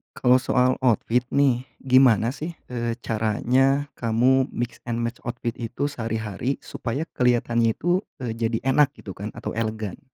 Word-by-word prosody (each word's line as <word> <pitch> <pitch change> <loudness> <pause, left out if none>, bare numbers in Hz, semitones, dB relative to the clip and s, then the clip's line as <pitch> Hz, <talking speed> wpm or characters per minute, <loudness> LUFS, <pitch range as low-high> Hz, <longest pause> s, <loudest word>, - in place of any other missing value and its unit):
Kalau 125 0 +4
soal 130 0 +2
outfit, 120 0 +1
nih, 130 -2 +2 0.2
gimana, 125 -4 +5
sih, 160 +5 -6 0.2
eee, 120 -1 -2
caranya 130 +6 +1
kamu 125 +3 +3
mix 120 0 -4
and 120 0 -1
match 115 0 -3
outfit 120 0 -2
itu 125 +5 -2
sehari-hari, 115 0 -3
supaya 130 +6 -3 0.2
kelihatannya 120 -2 +2
itu, 175 +2 +1 0.2
eee, 120 - -2
jadi 115 0 -2
enak, 140 +2 +3
gitu, 100 - -9
kan, 100 +2 -6
atau - - -5
elegan? 110 -3 -3
120 Hz, 150 wpm, -24 LUFS, 115-130 Hz, 0.2 s, gimana